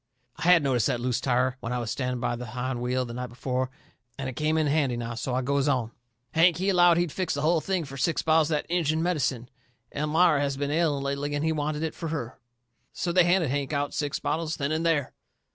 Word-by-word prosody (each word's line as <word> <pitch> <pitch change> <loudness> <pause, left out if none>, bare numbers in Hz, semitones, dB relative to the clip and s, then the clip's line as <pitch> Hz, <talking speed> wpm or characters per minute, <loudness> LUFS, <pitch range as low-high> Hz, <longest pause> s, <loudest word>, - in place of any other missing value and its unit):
I - - -11
had 175 -3 +6
noticed 130 -5 +2
that 125 -4 0
loose 125 0 -1
tire 130 0 +1
when 115 -1 -5
I 125 - -1
was 115 -2 -3
standing 125 -1 -2
by 120 0 -1
the 120 0 -7
hind 125 +2 -3
wheel 125 +1 0
the 120 - -7
night 125 +1 -4
before, 130 +2 -2 0.5
and 135 -1 -4
it 130 - -4
come 155 +4 0
in 155 - +2
handy 140 -4 +1
now. 120 0 -4
So 125 +2 -3
I 130 - 0
goes 140 +2 +1
on: 125 -5 0 0.4
"Hank, 165 0 +4
he 190 +2 0
allowed 175 -3 +5
he'd 175 -2 0
fix 185 -2 -2
the 140 - -2
hull 165 +1 +3
thing 185 -2 -1
fur 135 0 -9
six 160 +4 0
bottles 160 -1 +3
of 155 - +2
that - - -4
Injun 160 -2 0
medicine. 135 -8 -1 0.5
Elmira 150 +1 +3
has 140 -1 -1
been 145 0 -2
ailing 150 -3 +1
lately, 140 +1 -2
and 145 +2 -1
he 160 - +2
wanted 150 0 -2
it 160 - -2
fur 165 - -5
her. 145 -7 -5 0.5
So 175 - -2
they 180 0 +5
handed 175 -5 +2
Hank 140 +1 -2
out 145 0 -1
six 145 -1 -1
bottles 160 0 -2
then 140 0 -1
and 160 +1 0
there." 155 -5 +1
145 Hz, 245 wpm, -27 LUFS, 125-160 Hz, 0.5 s, had